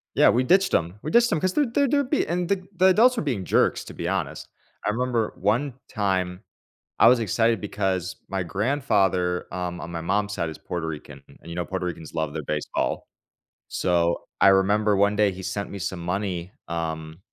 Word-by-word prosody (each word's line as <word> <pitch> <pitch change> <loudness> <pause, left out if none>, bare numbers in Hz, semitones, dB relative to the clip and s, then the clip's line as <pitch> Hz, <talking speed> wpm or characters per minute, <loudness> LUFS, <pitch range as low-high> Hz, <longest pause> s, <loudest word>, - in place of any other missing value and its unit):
Yeah, - - +6
we 125 - +3
ditched 190 +7 +4
them. 85 +2 0
We 155 - -4
ditched 235 0 +5
them 165 - +1
'cause 185 0 +1
they're 295 - +3
they're 280 +4 +2
they're 285 +2 +3
be 290 +4 +1
and 175 +1 -1
the 185 -1 -1
the 185 - +4
adults 230 +7 +5
were - - 0
being 125 -10 -2
jerks, - - +2
to - - -9
be - - -4
honest. - - -3 0.4
I - - +2
remember 120 -1 -1
one 120 +8 0 0.2
time, 95 -3 -1 0.6
I 115 - +8
was 125 +1 +6
excited 115 +1 +1
because 95 -3 -2
my 95 -1 -1
grandfather, 95 - +1
um, 90 -1 -4
on 85 - -7
my 85 -1 -4
mom's 100 +4 0
side 85 -4 -2
is 80 - -10
Puerto 85 -2 -4
Rican, 75 -3 -7
and, - - -19
you 85 - -6
know, 90 0 -2
Puerto 95 0 -3
Ricans 80 -3 -6
love 80 -2 -2
their 80 - -3
baseball, 75 +1 -2 0.6
so, 85 -1 +1 0.2
I 100 - +7
remember 100 +2 +4
one 100 +1 +3
day 105 -2 +4
he 95 +1 -8
sent 100 +2 -3
me 100 - -6
some 90 +1 -3
money, 90 0 -3 0.2
um, 80 -1 -4
95 Hz, 205 wpm, -25 LUFS, 85-125 Hz, 0.6 s, I